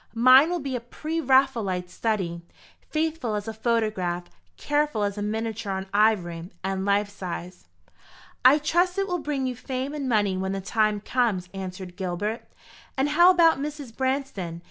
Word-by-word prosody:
Mine 255 +6 +7
will 355 0 -1
be 275 -3 -4
a - - -1
pre 315 +7 -4
Raphaelite 245 - +2
study 185 -5 -2 0.5
faithful 310 -8 -1
as 205 0 -4
a 225 - -3
photograph, 215 -6 -1 0.3
careful 295 -7 0
as 200 -1 -1
a 205 - -5
miniature 220 0 -3
on 190 0 -3
ivory, 180 -5 +1
and 190 0 -2
life 200 +1 +2
size." 185 -3 -7 0.8
"I 260 +4 +8
trust 345 +5 +1
it 390 0 0
will 355 -2 -1
bring 290 -4 -2
you 255 -1 -2
fame 260 +3 -4
and 280 -3 -3
money 205 -4 +2
when 190 +1 -2
the 195 - -2
time 215 +1 +1
comes," 210 -7 0
answered 185 -1 -7
Gilbert. 205 +4 -3 0.5
"And 270 +2 +2
how 345 +4 +6
about 335 -5 +5
Mrs. 290 -5 -6
Branston? 260 -11 -2
225 Hz, 165 wpm, -25 LUFS, 195-275 Hz, 0.8 s, I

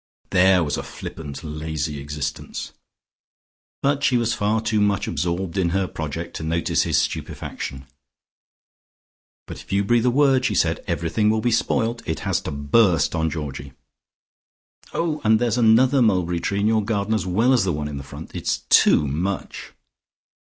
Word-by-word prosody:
There 95 -1 +5
was 75 - -2
a - - -2
flippant, 75 -3 -8
lazy 75 -1 -4
existence. 75 +1 -5 1.1
But 140 0 +1
she 125 - +3
was 115 0 +1
far 110 -1 0
too 110 -1 0
much 100 -1 +1
absorbed 90 +1 -2
in 90 -2 +2
her 95 -1 0
project 80 +1 -5
to - - -6
notice 85 +1 0
his - - +1
stupefaction. 65 0 -4 1.6
"But - - -9
if - - -14
you 100 +1 +2
breathe 120 +4 +2
a - - +5
word," 135 0 +3
she 110 -5 0
said, - - +1
"everything 105 +6 0
will 110 0 +2
be 120 +2 0
spoilt. 115 +1 0
It 80 - -2
has - - 0
to - - -5
burst 75 +3 +2
on 80 -1 0
Georgie. 70 -4 -6 1.2
Oh, 160 -2 -2
and 110 0 +4
there's 120 0 0
another 125 +4 +5
mulberry 90 -6 +2
tree 100 +3 -1
in 105 - +2
your 110 -1 +2
garden 105 0 -1
as 110 -3 -1
well 115 +8 +3
as 125 - +3
the 95 - 0
one 75 -2 -3
in 70 -1 -5
front. 70 +3 -10
It's - - -2
too 75 - +5
much." 90 +7 -4
95 Hz, 165 wpm, -22 LUFS, 80-115 Hz, 1.6 s, There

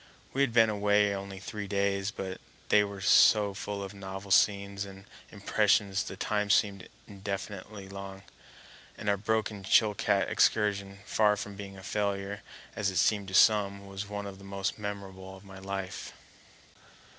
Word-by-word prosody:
We 135 - 0
had 140 -3 +3
been 115 -1 +5
away 105 0 +3
only 100 0 -6
three 100 +1 -6
days, 100 0 0
but 95 -2 -6 0.3
they 105 - +6
were 100 -1 -6
so 100 +1 +5
full 100 0 -5
of 100 +1 -7
novel 95 0 -8
scenes 100 0 +3
and 95 -1 -11 0.3
impressions 100 -1 +2
the 95 - -8
time 105 0 -1
seemed 100 -2 +2 0.2
indefinitely 100 0 -6
long, 95 0 -8 0.7
and - - -7
our 100 - +4
broken 105 0 -1
Chilcat 105 +2 +3
excursion, 100 -2 +1
far 105 -1 +3
from 100 0 -6
being 100 -1 -8
a 95 - -11
failure 100 -1 -2 0.3
as 100 -2 0
it 95 - -4
seemed 105 -2 +2
to 95 - -4
some, 100 -2 +4
was 100 +1 -6
one 100 0 -4
of 100 -1 -8
the - - -13
most 100 +1 -3
memorable 95 -2 -7
of 95 - -17
my 95 -1 -11
life. 95 -1 -5
100 Hz, 160 wpm, -29 LUFS, 95-105 Hz, 0.7 s, they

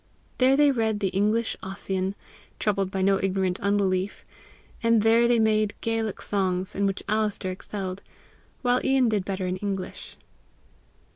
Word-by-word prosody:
There 265 +1 +5
they 290 -1 +5
read 220 -4 0
the 195 -2 0
English 210 +4 +1
Ossian, 190 0 -3 0.4
troubled 195 -3 0
by 190 0 -2
no 195 0 +3
ignorant 190 -1 0
unbelief; 200 -1 0 0.6
and 230 -2 +3
there 230 +1 +5
they 240 0 +3
made 215 -2 +2
Gaelic 225 -2 -2
songs, 185 -2 -1
in 200 0 +1
which 195 - -3
Alister 210 -3 0
excelled, 190 0 -6 0.6
while 245 0 +2
Ian 265 -3 +3
did 210 -3 0
better 190 -1 -3
in 180 0 -2
English. 195 -1 -5
200 Hz, 145 wpm, -26 LUFS, 190-225 Hz, 0.6 s, There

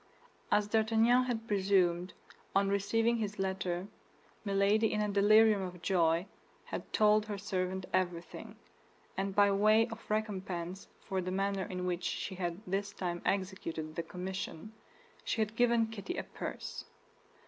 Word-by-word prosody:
As 205 0 +3
D'Artagnan 225 +3 +3
had 230 -3 -3
presumed, 190 -3 +2 0.4
on 195 0 +3
receiving 225 +4 +2
his 210 -2 -3
letter, 190 -1 -2 0.6
Milady 200 +2 +2
in 210 - 0
a 210 - +1
delirium 210 +1 +5
of 180 -1 -6
joy 170 -2 +2 0.4
had - - -6
told 215 0 +4
her 205 -2 -3
servant 190 -1 -2
everything; 175 -2 -2 0.6
and 195 0 -2
by 205 -1 +5
way 215 +3 +5
of 225 - -10
recompense 190 -4 -3
for 190 -1 -2
the 180 - -4
manner 195 0 -1
in 180 -1 -3
which 180 -1 -1
she 190 - -3
had 175 0 -3
this 195 +2 -2
time 175 -2 -3
executed 185 -5 -2
the - - -1
commission, 180 +3 -6 0.5
she - - -2
had 215 0 0
given 235 -1 +3
Kitty 225 - -6
a - - -2
purse. - - -6
195 Hz, 145 wpm, -32 LUFS, 185-215 Hz, 0.6 s, delirium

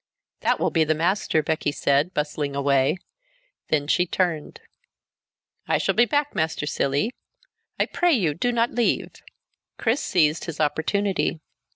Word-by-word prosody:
"That - - +1
will - - +1
be 165 - +3
the 155 0 +1
master," 170 -1 +1
Becky 155 -1 -1
said, 145 +4 +1
bustling 150 -3 -2
away. 140 +2 +2 0.7
Then 145 -2 +1
she 180 +4 +2
turned. 170 -4 -2 1.1
"I - - +2
shall - - 0
be 240 - +4
back, 290 +5 0
Master 160 -2 -1
Cilley! 145 - 0 0.7
I - - +3
pray 350 -1 +1
you, 180 - +2
do 245 +11 0
not 235 0 +1
leave!" 240 -1 0 0.7
Chris 235 +6 0
seized 160 -4 +1
his 165 -3 -6
opportunity. 165 +4 0
160 Hz, 145 wpm, -24 LUFS, 150-205 Hz, 1.1 s, be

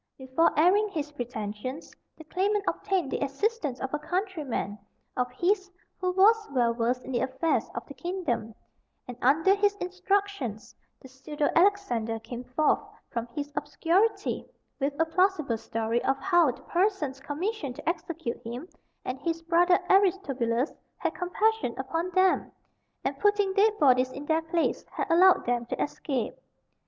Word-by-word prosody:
Before 265 +5 +2
airing 390 +7 +4
his 300 -6 -4
pretensions, 245 +1 -5 0.2
the 315 - -11
claimant 395 +5 0
obtained 365 -9 0
the - - -1
assistance 290 - -1
of 265 +1 -4
a 300 - 0
countryman 305 - -3 0.4
of 250 0 -1
his 375 +7 +1 0.3
who 365 -1 0
was 420 +3 +5
well 240 -3 +2
versed 240 +2 0
in - - -6
the 240 - +1
affairs 265 +6 0
of - - -4
the - - -10
kingdom, 335 - -3 0.5
and 250 - -6
under 315 +9 +4
his 405 0 +2
instructions 370 - -2 0.3
the - - -13
pseudo 290 +3 -2
Alexander 335 - +2
came 240 +2 -7
forth 255 +5 +2 0.3
from 235 0 -3
his 285 +4 -6
obscurity 335 +8 +1 0.4
with 280 +1 -1
a 325 - +4
plausible 325 - +1
story 225 +2 -1
of 270 0 +1
how 350 -2 +4
the 250 - -6
persons 350 -8 0
commissioned 295 - -3
to - - -11
execute 330 -6 -3
him 240 +8 -6 0.4
and 255 +1 -3
his 330 0 -2
brother 350 +2 +4
Aristobulus 295 - +2 0.2
had - - -1
compassion 405 - 0
upon 330 +6 -2
them, 375 0 +3 0.5
and - - -2
putting 410 -2 +2
dead 420 +2 +3
bodies 260 -5 +4
in 280 +2 -7
their 320 +1 +2
place, 325 +1 0
had - - -1
allowed 365 +2 +6
them 240 -1 0
to - - -4
escape. 290 - -2
310 Hz, 150 wpm, -28 LUFS, 255-375 Hz, 0.5 s, allowed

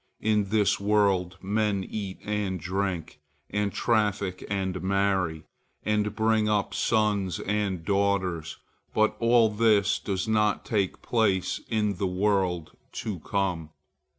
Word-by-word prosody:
In 105 -1 +2
this 105 -1 +2
world, 100 -3 +2
men 105 0 0
eat 100 -3 -5
and 105 -3 -2
drink, 95 -4 -3 0.3
and 105 0 0
traffic 105 -5 0
and 95 -2 -2
marry, 95 -4 0 0.4
and 105 0 0
bring 110 -1 +2
up 105 -2 0
sons 105 -5 +1
and 100 -5 -1
daughters, 95 -5 0 0.4
but 110 0 +3
all 115 -1 +4
this 105 -2 +3
does 95 0 -2
not 105 -1 +1
take 100 -4 -1
place 105 -6 +1
in 105 -3 0
the 95 - 0
world 90 -3 0 0.2
to 105 -6 -4
come. 90 -3 -2
100 Hz, 125 wpm, -27 LUFS, 95-105 Hz, 0.4 s, all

